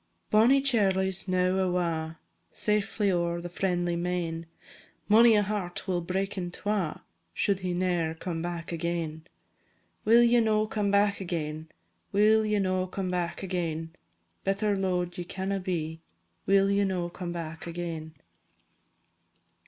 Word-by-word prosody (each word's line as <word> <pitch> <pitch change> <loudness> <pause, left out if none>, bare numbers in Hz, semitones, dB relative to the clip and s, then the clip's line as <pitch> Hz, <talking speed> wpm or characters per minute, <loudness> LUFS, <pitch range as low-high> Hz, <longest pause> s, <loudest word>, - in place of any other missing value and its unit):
Bonnie 240 +6 +5
Charlie 195 -7 +3
's 190 +1 -3
now 185 0 +2
awa', 170 -3 -1 0.3
Safely 210 -1 +1
ower 170 -1 0
the 175 +1 -6
friendly 175 +1 -1
main; 170 -1 -2 0.6
Mony 225 +2 +7
a 205 - +4
heart 195 -3 -3
will 180 -2 0
break 190 +3 -2
in 175 -1 -3
twa 195 -3 -2 0.3
Should 200 -2 +2
he 180 -2 -2
ne'er 175 -3 0
come 165 0 -4
back 170 0 -4
again. 165 -1 -3 0.8
Will 230 +2 +6
ye 240 0 +5
no 215 -1 +2
come 210 -2 -1
back 200 0 +2
again? 160 -3 -4 0.4
Will 215 +2 +4
ye 210 -1 +1
no 185 -1 0
come 185 0 -3
back 175 +1 -2
again? 165 -3 -3 0.5
Better 200 +1 +1
lo'ed 180 -2 -1
ye - - -2
canna 190 +2 -3
be 165 -3 -3 0.5
Will 195 0 +4
ye 200 0 +3
no 185 -3 -1
come 175 0 -6
back 165 -1 -6
again? 165 -2 -5
185 Hz, 140 wpm, -28 LUFS, 170-200 Hz, 0.8 s, Mony